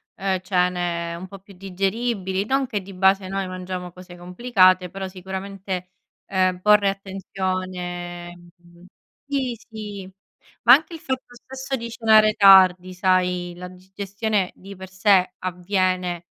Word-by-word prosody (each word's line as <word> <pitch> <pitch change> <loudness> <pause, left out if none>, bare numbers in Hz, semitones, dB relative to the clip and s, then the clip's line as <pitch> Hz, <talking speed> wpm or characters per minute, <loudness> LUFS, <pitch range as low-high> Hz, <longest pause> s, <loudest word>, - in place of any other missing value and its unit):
ehm, 190 -1 -1
cene 180 -2 -1
un 185 +2 -8
po' 195 0 -11
più 195 +1 -17
digeribili, 195 +1 -2
non 270 +2 +1
che 210 -6 -3
di 195 +1 -11
base 190 +1 +2
noi 195 -1 -2
mangiamo 185 -1 -6
cose 180 -1 -13
complicate, 185 -1 +2
però 195 +1 -6
sicuramente, 190 0 -6 0.3
ehm, 185 -1 0
porre 210 0 +4
attenzione, 185 -2 -5 0.2
mh 175 0 -21 0.4
sì, 265 -4 -1
sì, 205 -4 -9 0.5
ma 240 +1 +9
anche 315 +4 +3
il - - -9
fatto 260 -3 -5
stesso 265 +2 -6
di 235 0 -6
cenare 220 -2 +4
tardi 185 -2 +6
sai, 180 -1 +1
la 180 +1 -8
digestione 195 +2 -3
di 195 +1 -12
per 190 0 -10
sé 190 -1 +2
avviene 180 -1 -1
190 Hz, 135 wpm, -23 LUFS, 180-200 Hz, 0.5 s, ma